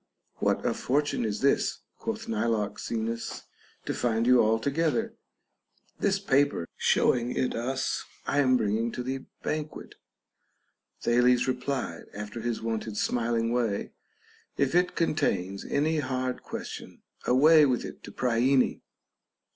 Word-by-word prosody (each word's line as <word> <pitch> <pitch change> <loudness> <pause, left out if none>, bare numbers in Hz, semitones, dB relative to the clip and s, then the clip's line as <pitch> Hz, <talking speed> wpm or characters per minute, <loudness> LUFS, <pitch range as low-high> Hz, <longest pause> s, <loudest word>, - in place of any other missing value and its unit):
What - - 0
a - - +2
fortune 145 0 0
is 105 -1 -2
this 140 +1 +2 0.2
(quoth 225 0 -4
Nilox 115 - -1
enus) 115 0 -3 0.4
to - - -1
find 115 -1 0
you 125 0 +6
all 110 +1 +3
together! 165 - 0 0.9
This 200 -1 +2
paper 140 - +1
(showing 120 0 +2
it 130 - 0
us) 130 +3 -2 0.2
I 145 - +1
am 130 -2 +4
bringing 110 +1 0
to 125 - -4
the 130 +1 -4 0.2
banquet. 155 0 -4 1.1
Thales 125 +1 +3
replied, 130 +1 -2
after 105 +2 -6
his 120 -1 -2
wonted 110 -2 -3
smiling 115 -1 0
way, 115 -4 -1 0.7
If 140 0 +1
it 180 +1 +2
contains 100 - 0
any 155 +2 +1
hard 130 -2 -2
question, - - -8 0.2
away 150 +4 +6
with 125 -2 0
it - - -9
to - - -9
Priene. 125 +2 +2
125 Hz, 130 wpm, -28 LUFS, 115-145 Hz, 1.1 s, you